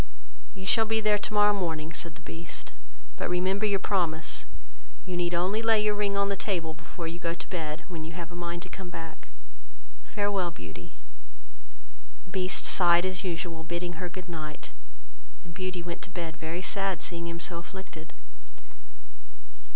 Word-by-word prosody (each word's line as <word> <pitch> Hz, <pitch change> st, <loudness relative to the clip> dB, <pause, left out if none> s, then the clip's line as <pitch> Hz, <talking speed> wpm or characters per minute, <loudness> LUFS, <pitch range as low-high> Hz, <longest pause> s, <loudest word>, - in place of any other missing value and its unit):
"You 190 Hz, -1 st, -6 dB
shall 225 Hz, +3 st, +6 dB
be 220 Hz, 0 st, +4 dB
there 210 Hz, -1 st, +4 dB
tomorrow 210 Hz, 0 st, +5 dB
morning, 165 Hz, -4 st, -1 dB
(said 165 Hz, +2 st, -3 dB
the 165 Hz, -, -13 dB
Beast,) 165 Hz, -1 st, -4 dB, 0.4 s
but -, -, 0 dB
remember 190 Hz, +4 st, +3 dB
your 200 Hz, -1 st, +4 dB
promise: 175 Hz, -5 st, +1 dB, 0.6 s
you 185 Hz, -2 st, -2 dB
need 175 Hz, 0 st, +2 dB
only 190 Hz, +6 st, +3 dB
lay 225 Hz, -1 st, +6 dB
your 210 Hz, 0 st, +4 dB
ring 205 Hz, -1 st, +1 dB
on 200 Hz, 0 st, +4 dB
the 200 Hz, -, +1 dB
table 175 Hz, -5 st, 0 dB
before 165 Hz, +1 st, -6 dB
you 170 Hz, +1 st, -4 dB
go 170 Hz, -1 st, 0 dB
to -, -, -8 dB
bed, 160 Hz, -2 st, -2 dB
when 170 Hz, -4 st, -4 dB
you 160 Hz, +1 st, -5 dB
have 170 Hz, 0 st, -5 dB
a -, -, -7 dB
mind 175 Hz, 0 st, -2 dB
to -, -, -6 dB
come 190 Hz, -2 st, -6 dB
back: 165 Hz, -2 st, -7 dB, 0.8 s
farewell, 205 Hz, -4 st, +1 dB
Beauty." 85 Hz, -, -9 dB, 1.4 s
Beast 185 Hz, -1 st, +1 dB
sighed 175 Hz, -1 st, +6 dB
as 185 Hz, 0 st, -1 dB
usual, 170 Hz, -2 st, -2 dB
bidding 175 Hz, 0 st, -2 dB
her 180 Hz, -, -1 dB
good 180 Hz, +1 st, -7 dB
night; 155 Hz, -3 st, -5 dB, 0.7 s
and 175 Hz, -, -9 dB
Beauty 185 Hz, -1 st, -2 dB
went 170 Hz, -1 st, -4 dB
to -, -, -6 dB
bed 170 Hz, -3 st, -3 dB
very 160 Hz, +4 st, -3 dB
sad 195 Hz, 0 st, +3 dB
at 165 Hz, -, -7 dB
seeing 170 Hz, -1 st, -1 dB
him 170 Hz, 0 st, -3 dB
so 170 Hz, -1 st, 0 dB
afflicted. 170 Hz, -3 st, -8 dB
175 Hz, 175 wpm, -30 LUFS, 165-195 Hz, 1.4 s, shall